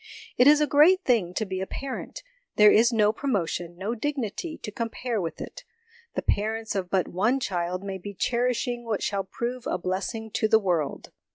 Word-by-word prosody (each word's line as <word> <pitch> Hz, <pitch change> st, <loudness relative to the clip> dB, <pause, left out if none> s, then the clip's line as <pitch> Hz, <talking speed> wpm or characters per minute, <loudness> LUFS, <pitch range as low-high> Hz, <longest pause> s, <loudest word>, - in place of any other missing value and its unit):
It 250 Hz, -, +5 dB
is 295 Hz, 0 st, +7 dB
a -, -, +5 dB
great 325 Hz, +7 st, +5 dB
thing 220 Hz, -9 st, +2 dB
to 220 Hz, -, 0 dB
be 190 Hz, -1 st, -4 dB
a 190 Hz, -, -3 dB
parent: 270 Hz, -, -6 dB, 0.3 s
there 210 Hz, 0 st, +7 dB
is 235 Hz, +3 st, +5 dB
no 215 Hz, -2 st, +3 dB
promotion, 175 Hz, -9 st, -2 dB
no 200 Hz, +5 st, -2 dB
dignity, 280 Hz, -, -3 dB
to 210 Hz, -, -5 dB
compare 230 Hz, 0 st, -3 dB
with 165 Hz, -2 st, -5 dB
it. -, -, -8 dB, 0.5 s
The -, -, -2 dB
parents 220 Hz, +2 st, -1 dB
of 190 Hz, -3 st, -2 dB
but 190 Hz, -1 st, +1 dB
one 220 Hz, +9 st, +1 dB
child 180 Hz, -5 st, -2 dB
may 195 Hz, -1 st, -5 dB
be 200 Hz, +2 st, -8 dB
cherishing 240 Hz, +2 st, 0 dB
what 225 Hz, -3 st, -2 dB
shall 200 Hz, -1 st, -1 dB
prove 240 Hz, +5 st, -4 dB
a -, -, 0 dB
blessing 195 Hz, +5 st, -3 dB
to 220 Hz, -, +1 dB
the 220 Hz, -, +6 dB
world. 175 Hz, -8 st, -1 dB
220 Hz, 190 wpm, -26 LUFS, 190-245 Hz, 0.5 s, is